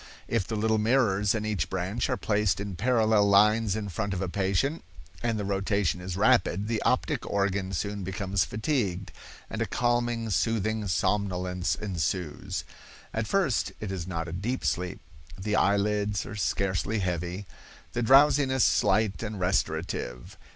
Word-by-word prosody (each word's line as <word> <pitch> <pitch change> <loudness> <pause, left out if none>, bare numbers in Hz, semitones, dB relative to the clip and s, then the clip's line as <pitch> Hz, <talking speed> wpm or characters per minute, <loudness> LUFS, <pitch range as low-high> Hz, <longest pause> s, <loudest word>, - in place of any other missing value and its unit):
If 115 -5 0
the 110 - -3
little 110 +1 +1
mirrors 105 -3 +2
in 110 -1 -2
each 110 -2 -1
branch 95 +5 -2
are - - 0
placed 105 -3 +1
in 100 -2 -4
parallel 110 -1 +3
lines 105 +1 +4
in 110 -2 -3
front 100 +2 -2
of 90 - -3
a - - -2
patient, 100 - 0 0.4
and 115 -2 0
the 105 - -3
rotation 95 -2 0
is 90 0 -5
rapid, 105 -3 +3
the 115 -1 -1
optic - - +1
organ 100 -1 0
soon 100 +2 -3
becomes 95 0 -1
fatigued, 105 - -2 0.4
and - - -5
a - - 0
calming 120 -2 0
soothing 110 0 0
somnolence 90 -1 0
ensues. 90 -4 -3 0.5
At 110 -1 -2
first 180 - +1
it 105 -3 -4
is 90 -2 -4
not 85 -2 -3
a 85 - -6
deep 115 +9 -3
sleep, 90 0 -1 0.4
the 105 +2 -1
eye 100 -1 +3
lids 105 0 0
are 110 - -7
scarcely 100 +1 0
heavy, 90 0 -2 0.5
the 120 - -1
drowsiness 135 +1 +5
slight 105 -2 +2
and 110 -3 -4
restorative. 80 -8 -2
100 Hz, 155 wpm, -28 LUFS, 95-110 Hz, 0.5 s, drowsiness